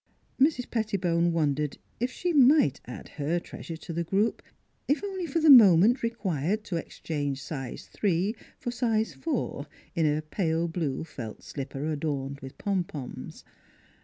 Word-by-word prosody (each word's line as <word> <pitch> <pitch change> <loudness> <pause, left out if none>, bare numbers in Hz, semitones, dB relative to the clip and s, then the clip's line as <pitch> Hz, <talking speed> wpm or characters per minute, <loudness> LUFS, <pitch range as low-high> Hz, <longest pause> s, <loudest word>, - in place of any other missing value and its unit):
Mrs. 275 -4 +3
Pettibone 180 -7 +1
wondered 150 -3 0 0.2
if 245 +2 0
she 355 +4 -2
might 270 - +5
add 125 - -8
her 160 +5 +1
treasure 165 -1 -8
to 165 - -7
the 170 +1 -1
group 200 +6 +1 0.5
if 295 +7 +1
only 380 -3 -3
for 325 +3 0
the 315 -2 +7
moment 220 -1 +8
required 210 - -1
to 200 -5 -4
exchange 145 -4 -3
size 135 -2 -6
three 195 +2 0 0.2
for 240 - -4
size 225 -3 0
four 250 - -3 0.3
in 160 -2 +2
a 150 +1 0
pale 165 0 0
blue 160 -5 -2
felt 120 -9 -8
slipper 140 0 -5
adorned 140 -3 -2
with 135 -1 -10
pompons. 175 -9 -4
170 Hz, 145 wpm, -28 LUFS, 150-230 Hz, 0.5 s, moment